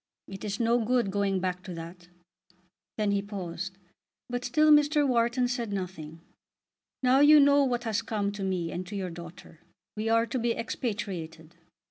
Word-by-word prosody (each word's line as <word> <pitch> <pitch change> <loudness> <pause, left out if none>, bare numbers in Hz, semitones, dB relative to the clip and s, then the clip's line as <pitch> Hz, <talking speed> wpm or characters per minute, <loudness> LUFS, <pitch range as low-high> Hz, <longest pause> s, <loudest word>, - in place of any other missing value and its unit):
It 195 0 -9
is 205 -1 -3
no 235 0 +2
good 235 -3 +1
going 200 -1 0
back 180 0 -2
to 185 -2 -8
that." 170 +2 -9 0.9
Then 210 -2 +1
he 200 0 +1
paused, 190 -2 -6 0.5
but 245 0 -2
still 305 +2 +3
Mr. 295 0 +4
Wharton 240 0 +2
said 240 -3 -3
nothing. 175 -5 -6 0.8
"Now 255 +1 +5
you 295 +1 +8
know 285 0 +5
what 245 -2 -1
has 225 -2 -1
come 210 -3 -2
to 205 0 -8
me 185 -3 -2
and 180 +1 -5
to 205 - -7
your 185 -3 -3
daughter. 170 -1 -11 0.4
We 215 +1 -2
are 230 0 +3
to 255 +2 -3
be 235 0 0
expatriated." 175 -9 -5
205 Hz, 170 wpm, -28 LUFS, 185-245 Hz, 0.9 s, you